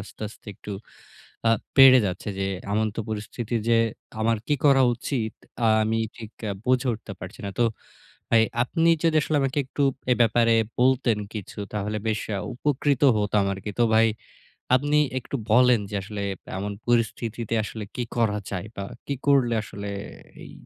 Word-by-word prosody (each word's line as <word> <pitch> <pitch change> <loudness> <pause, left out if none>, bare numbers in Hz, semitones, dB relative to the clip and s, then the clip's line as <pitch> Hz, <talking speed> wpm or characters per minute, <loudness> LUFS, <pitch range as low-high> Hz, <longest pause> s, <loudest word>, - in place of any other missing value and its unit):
আস্তে, 95 - -11
আস্তে 110 - -17
একটু 105 - -8 0.8
আ - - +5 0.3
পেড়ে 135 -1 +9
যাচ্ছে 90 +3 -4
যে 95 - 0 0.3
এমন 110 0 0
পরিস্থিতি 110 +2 -4
যে 115 -1 +5 0.4
আমার 115 +1 +2
কি 150 - +2
করা 135 -2 +6
উচিত 115 -2 -3 0.5
আমি 110 +1 0 0.2
ঠিক 110 -2 -9 0.2
আ - - -1
বুঝে 130 0 +2
উঠতে 110 -2 -9
পারছি 95 +8 -9
না। - - -3
তো 120 - +4 0.7
ভাই 115 -1 +5 0.2
আপনি 165 +6 +1
যদি 165 -1 +3
আসলে 150 +1 0
আমাকে 135 +1 -1
একটু 140 +2 -2 0.3
এ - - +7
ব্যাপারে 115 0 +4 0.3
বলতেন 125 -3 +3 0.2
কিছু 105 -1 -7
তাহলে 105 +1 -2
বেশ 110 -1 0 0.2
আ - - -2
উপকৃত 140 +1 0 0.2
হতাম 105 -1 +1
আরকি। 95 +2 -6
তো - - +6
ভাই, 115 +1 +6 0.7
আপনি 145 +3 +2 0.2
একটু 135 - -6 0.2
বলেন 125 0 +6
যে 105 - -4
আসলে 105 +1 -6 0.4
এমন 100 +2 -3 0.2
পরিস্থিতিতে 115 -1 0
আসলে 110 0 -6
কী 125 - -1
করা 110 -3 +2
যায়? 90 -1 -4
বা 100 - -4 0.2
কি 140 - -2
করলে 130 -4 +4
আসলে 100 0 -7 0.5
এই - - -11
115 Hz, 165 wpm, -25 LUFS, 105-130 Hz, 0.8 s, পেড়ে